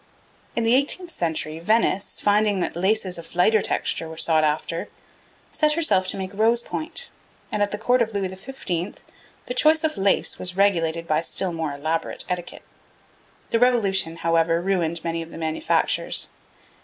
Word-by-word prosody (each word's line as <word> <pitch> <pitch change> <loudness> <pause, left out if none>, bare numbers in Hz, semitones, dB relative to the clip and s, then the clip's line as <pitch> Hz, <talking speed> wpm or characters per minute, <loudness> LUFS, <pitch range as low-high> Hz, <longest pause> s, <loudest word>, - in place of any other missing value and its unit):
In 235 - 0
the 225 +1 +3
eighteenth 295 +7 +1
century, 160 - -2
Venice, 200 +1 +1
finding 205 -1 +2
that 175 - -2
laces 190 0 0
of 165 +1 -11
lighter 215 +4 +4
texture 165 - -1
were 160 - -9
sought 160 -1 +3
after, 155 +2 -1 0.6
set 305 -1 +2
herself 300 - +2
to - - 0
make 190 0 -5
rose 230 +3 +2
point; 315 +6 -4 0.4
and 210 - -1
at 205 - +2
the 205 - -4
Court 245 +3 +2
of 225 -1 +1
Louis 200 -3 -2
XV. 190 -3 -4 0.5
the 250 - -4
choice 310 +5 +4
of 310 -9 -1
lace 195 0 +1
was 180 0 -3
regulated 170 -4 +2
by 155 -1 +1
still 180 +2 -1
more 160 -3 -3
elaborate 155 +3 -2
etiquette. 180 -1 -5 0.9
The 230 - +2
Revolution, 200 -9 +2
however, 165 0 +2
ruined 170 -3 0
many 165 0 -2
of 165 - -8
the - - -10
manufactures. 160 -1 +1
190 Hz, 165 wpm, -23 LUFS, 165-220 Hz, 0.9 s, lighter